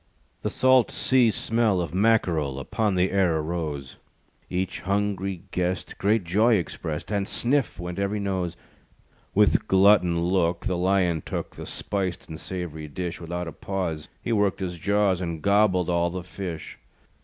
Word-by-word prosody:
The - - -1
salt 130 -2 +4
sea 130 -3 +3
smell 110 -1 +1
Of 85 -3 -3
Mackerel, 90 -10 +2
Upon 105 - -1
the 90 +1 +2
air 90 -4 +2
arose; 75 -4 -4 0.5
Each 95 +1 -2
hungry 100 -2 -1
guest 90 0 -2
Great 105 +1 +2
joy 105 +7 +3
expressed, 80 -2 -4
And 100 -1 0
"sniff!" 130 -4 0
went 90 +1 -5
every 100 +1 -1
nose. 95 -4 -2 0.8
With - - +4
glutton 95 -3 +5
look 85 -1 +1
The 95 - 0
Lion 90 -2 +2
took - - -5
The - - -8
spiced 95 -3 -3
and 80 0 -7
sav'ry 85 -5 -6
dish. 85 +3 -5
Without 85 +1 -4
a - - -4
pause 85 -6 -4
He - - -2
worked 105 -3 +2
his 90 -3 -4
jaws, 100 -1 +2
And 85 -2 -3
gobbled 100 -1 +3
all 85 -1 +1
the 90 0 -5
fish. 90 -3 -7
90 Hz, 155 wpm, -25 LUFS, 85-100 Hz, 0.8 s, glutton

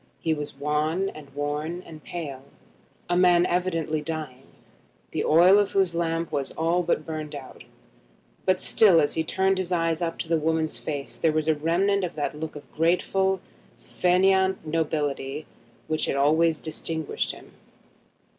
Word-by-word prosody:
He 160 - 0
was 150 -2 -5
wan 150 +6 0
and 150 -5 -11
worn 150 +4 -3
and 155 -2 -12
pale, 140 -6 -6 0.6
a 175 - +1
man 175 -1 +5
evidently 165 -4 0
dying, 150 -5 -6 0.6
the - - -1
oil 180 +6 +6
of 205 -1 0
whose 190 -3 +2
lamp 165 -1 -1
was 140 -3 -1
all 165 +2 +1
burned 155 -3 -2
out; 135 -2 -10 0.8
but 185 -1 +2
still 195 -7 +5
as 145 - +1
he 160 - 0
turned 190 +3 +1
his 185 -1 -3
eyes 165 -1 +1
up 165 -1 -2
to - - -4
the 165 -1 +2
woman's 160 0 -1
face 145 -2 -5
there 165 - +2
was 155 0 0
a 160 - +5
remnant 180 +6 +1
of 175 - -3
that 150 - -2
look 155 0 -6
of 145 - -8
graceful 190 +3 +1 0.4
fainéant 190 +1 +2
nobility 150 -2 -2 0.4
which 155 0 0
had - - 0
always 155 +3 +3
distinguished 160 0 -3
him. - - -14
160 Hz, 155 wpm, -25 LUFS, 150-180 Hz, 0.8 s, oil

